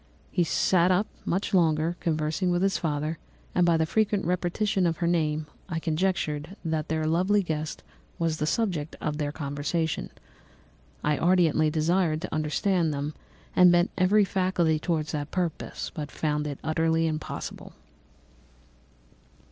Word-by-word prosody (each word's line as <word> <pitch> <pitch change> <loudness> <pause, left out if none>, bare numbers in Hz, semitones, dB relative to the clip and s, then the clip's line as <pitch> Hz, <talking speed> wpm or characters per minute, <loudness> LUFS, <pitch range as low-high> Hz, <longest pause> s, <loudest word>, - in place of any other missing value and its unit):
He 180 - +2
sat 175 +2 +3
up 185 +3 +3 0.2
much 190 +4 -1
longer, 165 -2 +3
conversing 160 +3 0
with 175 +1 +1
his 195 0 +1
father, 155 -1 -2 0.3
and 180 -1 +3
by 170 -1 +4
the 160 - +2
frequent 205 +2 +1
repetition 180 +2 +1
of 165 -2 -1
her 170 - -1
name 155 -3 +1 0.2
I 165 - -2
conjectured 165 0 -1
that 160 -2 -1
their 160 0 -1
lovely 185 +6 +2
guest 155 -2 -4 0.3
was 165 -2 0
the 150 - -1
subject 170 -7 -1
of 150 -1 -3
their 145 -1 -1
conversation. 145 +3 -2 0.9
I 150 -1 +1
ardently 165 -3 +3
desired 160 +1 +1
to - - -5
understand 160 +2 +1
them, 145 +1 -3 0.4
and 180 -1 +7
bent 175 0 +3
every 200 +3 +4
faculty 180 -4 +1
towards 160 -2 -1
that 145 -1 -3
purpose, 175 -4 -3
but 150 -2 -5
found 150 -1 -1
it 145 -2 -4
utterly 160 +1 +1
impossible. 155 -1 -5
165 Hz, 145 wpm, -27 LUFS, 155-180 Hz, 0.9 s, and